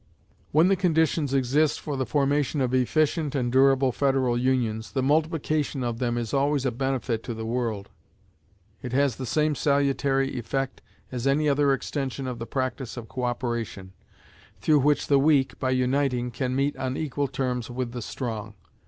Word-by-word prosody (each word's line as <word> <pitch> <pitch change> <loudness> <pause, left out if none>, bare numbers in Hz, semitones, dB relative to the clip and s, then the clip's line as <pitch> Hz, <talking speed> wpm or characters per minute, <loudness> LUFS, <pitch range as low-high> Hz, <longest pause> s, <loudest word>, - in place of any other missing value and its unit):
When 160 +4 +5
the 195 - +4
conditions 160 -5 +1
exist 140 +3 +2
for 145 - -4
the 130 -2 -2
formation 145 +3 +1
of 130 -2 0
efficient 150 +3 +1
and 125 -3 0
durable 135 0 +4
federal 135 -2 +1
unions, 120 -3 0
the 130 - 0
multiplication 155 -1 0
of 120 -1 -2
them 120 -1 0
is 120 +1 -3
always 140 0 +1
a 130 - +1
benefit 130 -2 -1
to 120 - -5
the 110 0 -5
world. 115 -4 -2 0.9
It 125 -1 -6
has 140 -2 +2
the 130 - -5
same 150 +4 +1
salutary 140 -1 +1
effect 135 +3 -3 0.3
as 125 0 -2
any 150 +3 +2
other 140 0 +3
extension 135 0 -2
of 125 -2 -4
the 115 - -5
practice 130 0 -3
of 115 -2 -7
co 125 +2 -3
operation, 120 -6 -3 0.7
through 150 -2 +3
which 145 +2 +2
the 140 -1 +4
weak, 135 -3 +2
by 130 - 0
uniting, 130 -1 +1
can 125 +2 -2
meet 140 +2 +1
on 130 0 -2
equal 145 -2 -1
terms 125 -2 -2
with 125 0 -3
the 120 0 -5
strong. 110 -3 -5
130 Hz, 170 wpm, -26 LUFS, 125-140 Hz, 0.9 s, When